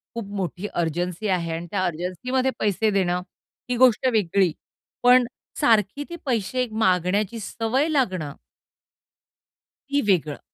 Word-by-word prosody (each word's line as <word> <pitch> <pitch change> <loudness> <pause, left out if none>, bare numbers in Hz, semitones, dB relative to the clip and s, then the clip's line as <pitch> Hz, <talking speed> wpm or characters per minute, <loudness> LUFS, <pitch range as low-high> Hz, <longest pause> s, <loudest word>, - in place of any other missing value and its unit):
खूप 230 -2 -4
मोठी 190 +1 -3
अर्जन्सी 175 +4 -2
आहे 175 -4 0
आणि 170 +1 -6
त्या 185 -2 0
अर्जन्सीमध्ये 185 +10 -1
पैसे 215 +1 +1
देणं 180 -3 +1 0.5
ही 250 - +1
गोष्ट 255 0 +5
वेगळी, 195 -4 +2 0.5
पण 250 0 +6 0.3
सारखी 220 +5 +3
ती 345 - -5
पैसे 250 0 0
मागण्याची 205 +1 +1
सवय 230 +7 -1
लागणं 185 - 0 1.6
ती 285 +1 +2
वेगळं. 155 -6 +1
205 Hz, 120 wpm, -24 LUFS, 180-245 Hz, 1.6 s, पण